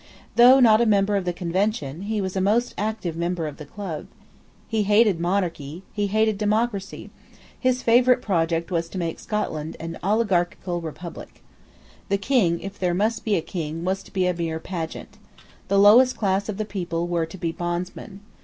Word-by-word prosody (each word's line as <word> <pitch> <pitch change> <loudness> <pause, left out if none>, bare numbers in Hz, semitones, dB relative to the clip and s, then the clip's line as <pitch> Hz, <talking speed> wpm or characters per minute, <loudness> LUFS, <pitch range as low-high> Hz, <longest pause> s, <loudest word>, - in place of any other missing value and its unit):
Though 250 +3 +8
not 225 -3 +6
a 235 - +3
member 205 -1 +3
of 195 -2 -1
the 180 - 0
Convention, 175 -3 -2
he 215 -2 0
was 190 -1 -4
a 190 - 0
most 220 +6 +1
active 210 -5 -3
member 170 0 -2
of 150 -2 -6
the 150 - -10
Club, 175 -4 -6 0.6
He 220 -1 0
hated 205 -2 +4
monarchy: 170 -3 -2
he 205 -1 0
hated 215 0 +1
democracy: 210 -1 -1 0.5
his 255 -1 +1
favourite 245 +2 +5
project 165 -5 -1
was 165 -1 -1
to 190 - -7
make 165 -2 -3
Scotland 160 -7 -3
an 165 0 -6
oligarchical 185 -4 0
republic. 165 +1 -9 0.7
The 200 - +2
King, 195 -6 +1
if 195 +1 -8
there 180 -2 0
must 215 +5 0
be 215 -2 +1
a 170 - +1
King, 165 -2 -5
was 190 +1 -1
to - - -17
be 185 -2 0
a 180 - +2
mere 165 -2 -3
pageant. 175 +4 -6 0.5
The 200 +1 +2
lowest 230 +6 +6
class 195 0 0
of 200 - -3
the 215 - -2
people 175 -4 -3
were 170 -2 -1
to 165 - -10
be 170 -2 -2
bondsmen. 175 +4 -5
190 Hz, 180 wpm, -24 LUFS, 170-215 Hz, 0.7 s, Though